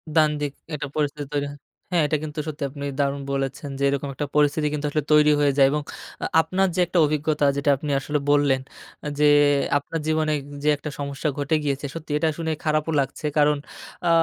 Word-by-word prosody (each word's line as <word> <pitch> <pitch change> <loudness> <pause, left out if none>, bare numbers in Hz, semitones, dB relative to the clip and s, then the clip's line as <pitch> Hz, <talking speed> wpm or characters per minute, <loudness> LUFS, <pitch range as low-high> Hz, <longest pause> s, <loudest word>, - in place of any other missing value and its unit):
দ্বান্দ্বিক 150 -2 +2 0.2
একটা 145 -1 -3
পরিস্থিতি 145 -1 -1
তৈরি 145 0 0
হয়। 145 - -12 0.3
হ্যাঁ, 170 -3 +3
এটা 155 +1 +1
কিন্তু 150 0 -5
সত্যি 150 -1 -4
আপনি 140 +1 -7
দারুণ 140 0 0
বলেছেন, 135 +1 -3
যে - - -1
এরকম 140 0 -2
একটা 145 +2 -3
পরিস্থিতি 150 +1 +3
কিন্তু 150 0 -2
আসলে 150 -1 -1
তৈরি 150 0 +6
হয়ে 145 -1 +4
যায় 135 -1 +7
এবং 150 0 0 0.4
আ - - 0 0.2
আপনার 185 +4 +1
যে - - -1
একটা 175 0 +1
অভিজ্ঞতা 150 0 0
যেটা 140 +1 +1
আপনি 150 +1 -5
আসলে 145 +2 -1
বললেন 140 -2 +3 0.4
আ - - -2
যে 150 - +5 0.5
আপনার 160 +3 -4
জীবনে 155 -1 +1 0.3
যে 150 - +3
একটা 150 - -6
সমস্যা 140 +2 -2
ঘটে 145 +2 +1
গিয়েছে 140 0 -1
সত্যি 160 -2 -7
এটা 160 +1 +1
শুনে 160 -1 -2
খারাপও 155 0 0
লাগছে, 135 +3 -3
কারণ 150 0 +4 0.5
আ - - +3
150 Hz, 200 wpm, -24 LUFS, 140-155 Hz, 0.5 s, যায়